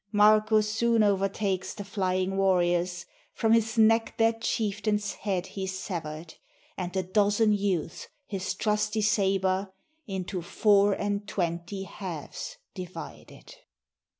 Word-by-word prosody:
Marko 215 +1 +5
soon 225 +1 +2
o'ertakes 195 -1 0
the 205 - -6
flying 190 -1 -1
warriors, 175 -2 +1 0.3
From 225 - +1
his 225 +1 +2
neck 225 +1 +4
their 225 0 +4
chieftain's 215 -2 -1
head 190 -4 -2
he 190 0 -5
sever'd; 170 -4 -5 0.4
And 180 -1 -4
the 190 0 -1
dozen 205 +3 +3
youths 195 -6 -2 0.2
his 190 -2 -3
trusty 210 +1 0
saber 195 -2 +1 0.4
Into 190 -1 -4
four 200 +3 +3
and 205 +1 -2
twenty 175 +1 -3
halves 175 -5 -7 0.2
divided. 185 - -9
200 Hz, 115 wpm, -28 LUFS, 185-210 Hz, 0.4 s, Marko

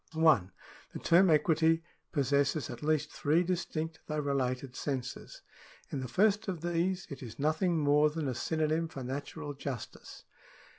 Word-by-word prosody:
1. 155 - +4 0.4
The - - -4
term 175 +2 +5
equity 160 +1 +3 0.3
possesses 140 0 +1
at - - -8
least 150 0 0
three 155 +4 +2
distinct 165 -3 -3
though 155 - -2
related 135 -3 -1
senses. 130 -4 -5 0.5
In 140 - -2
the 130 - -4
first 205 - +2
of 180 -5 -3
these, 175 +2 0
it 140 - -7
is 120 -4 -8
nothing 160 +4 +1
more 150 0 +4
than 155 -1 -3
a 130 - -1
synonym 155 +5 0
for 140 -4 -7
natural 145 +3 -5
justice. 135 -4 -7
155 Hz, 150 wpm, -31 LUFS, 140-165 Hz, 0.5 s, term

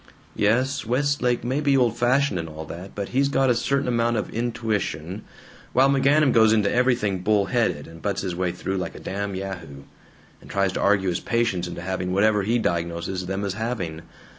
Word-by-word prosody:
"Yes, 125 +6 +1
Westlake 125 0 0
may 130 +4 -1
be 140 -2 +3
old 120 -3 +2
fashioned 120 -3 +2
and 80 -1 -5
all 80 +1 -8
that, 90 +5 -9
but 100 -1 -4
he's 140 +2 +2
got 135 -2 +3
a - - +2
certain 140 +4 0
amount 120 -1 +1
of - - -3
intuition, 110 -6 -2 0.5
while 135 +2 +5
McGanum 140 +1 +4
goes 110 -1 +5
into 105 -2 +2
everything 120 -6 +1
bull 105 +1 +2
headed, 95 -8 0
and 80 0 -13
butts 100 -2 -2
his 90 -3 -3
way 90 0 0
through 95 +2 -3
like 95 - -4
a - - -8
damn 100 0 -4
yahoo, 90 -8 -6 0.6
and - - -15
tries 100 -1 0
to - - -2
argue 100 -2 +3
his 85 - -1
patients 115 -7 0
into 85 0 -7
having 90 0 -2
whatever 105 +2 +3
he 110 +5 +1
diagnoses 85 -1 -2
them 95 +2 -2
as 100 - -2
having! 100 -8 -3
105 Hz, 195 wpm, -24 LUFS, 90-120 Hz, 0.6 s, while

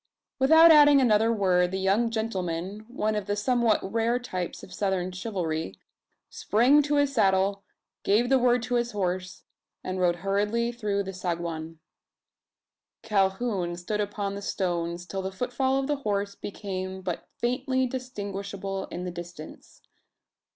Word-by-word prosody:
Without 320 +5 +7
adding 290 -2 +7
another 225 -3 +4
word, 185 -5 +2
the 190 - -3
young 195 +5 +2
gentleman 200 -3 -3
one 215 -3 -1
of 210 -2 -3
the 205 - 0
somewhat 235 0 +2
rare 230 +4 0
types 185 -8 -5
of 185 - -11
Southern 185 -1 -1
chivalry 175 - -3 0.5
sprang 250 +8 +3
to 290 0 0
his 285 -1 +2
saddle; 195 -3 +2 0.4
gave 215 +5 +2
the 265 +1 +4
word, 245 -1 +3
to 245 0 -3
his 240 -1 0
horse; 185 -2 -3 0.4
and 185 0 -3
rode 175 -1 +3
hurriedly 210 +4 +1
through 210 -4 -2
the 195 0 -6
saguan. 170 -3 -4 1.3
Calhoun 195 -3 0
stood 210 +5 -3
upon 205 -1 -3
the 200 - -6
stones, 175 -3 -2
till 190 +1 -4
the 190 0 -4
footfall 250 +5 -1
of 270 - 0
the 290 +1 -1
horse 205 -6 -2
became 190 -2 -6
but 180 -2 -5
faintly 260 +2 0
distinguishable 200 -6 -5
in 175 - -6
the 180 - -4
distance. 170 -2 -10
200 Hz, 145 wpm, -27 LUFS, 185-240 Hz, 1.3 s, Without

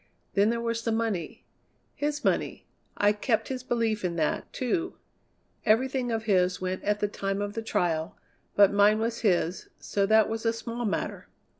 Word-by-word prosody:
Then 200 +1 +4
there 235 0 0
was 230 0 -2
the 230 - -1
money 220 -6 -2 0.5
his 295 0 -2
money. - - 0 0.3
I 205 0 +4
kept 220 +2 0
his 260 -1 -3
belief 230 -4 -1
in 175 -2 -1
that, 155 -2 -1
too. 335 +8 -2 0.7
Everything 250 +2 +2
of 225 -1 -1
his 185 -4 +2
went 185 0 -3
at 210 0 0
the 205 - +2
time 195 -1 -3
of 205 0 -3
the 225 - -3
trial, 175 -4 -1 0.4
but 200 -1 +6
mine 205 +1 +5
was 225 +1 -1
his, 180 -4 +1
so 200 -1 0
that 220 0 +5
was 225 0 -3
a 230 -1 +2
small 230 +1 -4
matter. 205 - -3
215 Hz, 175 wpm, -28 LUFS, 200-230 Hz, 0.7 s, but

